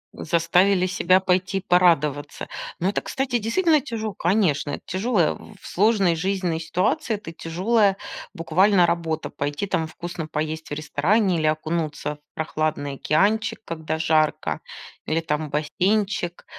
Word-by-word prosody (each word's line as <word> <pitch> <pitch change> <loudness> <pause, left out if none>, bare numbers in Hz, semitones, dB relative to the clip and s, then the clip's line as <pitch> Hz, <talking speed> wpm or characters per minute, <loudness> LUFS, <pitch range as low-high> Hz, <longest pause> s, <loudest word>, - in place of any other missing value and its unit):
Заставили 180 +3 +2
себя 185 0 +3
пойти 185 +1 +1
порадоваться. 165 -6 +2 0.3
Но 180 +3 +1
это, - - -1
кстати, 260 -3 -1
действительно 305 - +2
тяжел 220 -6 -4
конечно, 175 -6 +1
это - - -6
тяжело. 195 -1 0
В - - -12
сложной 195 -3 +3
жизненной 180 -1 -1
ситуации 200 - 0
это 185 -5 -8
тяжелая 195 +5 +1 0.4
буквально 180 +3 +4
работа, 165 -2 -2
пойти 145 +7 -3
там 160 -4 -1
вкусно 170 -1 -6
поесть 155 +1 -4
в - - -4
ресторане 170 +6 +1
или 155 - +1
окунуться 155 -1 -2
в - - -80
прохладный 155 -2 -2
океанчик, 215 +11 +1
когда 160 -1 -3
жарко, 155 -1 +1 0.5
или 160 +1 +1
там 155 -1 -2
бассейнчик, 175 +4 -1
175 Hz, 130 wpm, -23 LUFS, 155-200 Hz, 0.5 s, буквально